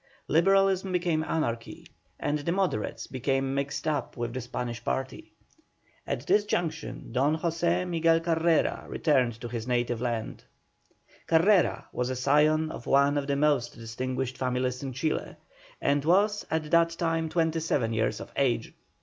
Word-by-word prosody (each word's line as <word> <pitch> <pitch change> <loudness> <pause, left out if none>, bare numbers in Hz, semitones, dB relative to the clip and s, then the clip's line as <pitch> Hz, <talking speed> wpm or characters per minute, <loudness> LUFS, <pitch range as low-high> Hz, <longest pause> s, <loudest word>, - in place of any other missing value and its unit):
Liberalism 195 +3 +3
became 175 -3 +1
anarchy, 115 -8 -3 0.3
and 150 +1 -1
the 145 +4 -2
Moderates 180 - -1
became 135 +1 -1
mixed 140 +3 -2
up 145 -4 -2
with 120 -1 -3
the 130 - -3
Spanish 120 -1 -5
party. 130 +1 -4 0.8
At 125 - -3
this 205 +5 +3
juncture 165 -6 -2
Don 140 +6 0
José 170 +2 0
Miguel 165 -1 +3
Carrera 165 -1 +1
returned 125 -7 +1
to 120 - -4
his 115 0 -5
native 120 -1 0
land. 120 -3 -3 0.8
Carrera 180 +4 +3
was 125 0 -1
a 130 - -2
scion 150 +4 +3
of 120 - -9
one 140 +1 +4
of 145 -1 -1
the 140 - +1
most 140 -4 +1
distinguished 130 +3 -4
families 125 0 -1
of 135 -3 -5
Chile, 155 +3 -2 0.4
and 140 0 +1
was 205 +6 +2
at 155 -1 -2
that 170 0 +5
time 165 -1 -1
twenty 165 0 +1
seven 130 -8 0
years 110 -1 0
of - - -9
age. 120 -4 0
145 Hz, 150 wpm, -28 LUFS, 125-165 Hz, 0.8 s, that